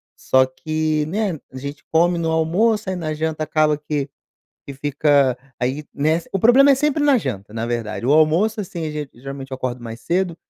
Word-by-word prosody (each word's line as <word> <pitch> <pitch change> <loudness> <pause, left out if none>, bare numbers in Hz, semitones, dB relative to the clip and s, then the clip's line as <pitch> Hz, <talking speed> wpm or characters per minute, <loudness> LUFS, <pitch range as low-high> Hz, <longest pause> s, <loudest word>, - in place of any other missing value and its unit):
só 130 0 +3
que, 155 +3 -1
né, 205 +2 -1 0.2
a 130 - -9
gente 140 +3 -7
come 170 +2 +3
no 165 -1 -1
almoço, 190 +6 +1
aí 185 - -2
na 155 -3 -3
janta 155 0 -2
acaba 155 -1 +2
que 150 -2 -3 0.6
que 140 - -7
fica 140 -2 +2 0.2
aí, 130 +5 -1
nessa 155 +4 0
o 195 - -1
problema 270 +6 +6
é - - +5
sempre 295 +1 +1
na 285 -3 +5
janta, 105 - -5
na 115 0 -3
verdade, 115 -1 -3
o 140 - +4
almoço 175 +9 +3
assim 170 -4 -5
a - - -3
gen 150 -2 -5
geralmente 135 +2 -8
eu - - -2
acordo 125 -2 -4
mais 115 0 -7
cedo, 175 +4 0
155 Hz, 200 wpm, -21 LUFS, 135-175 Hz, 0.6 s, problema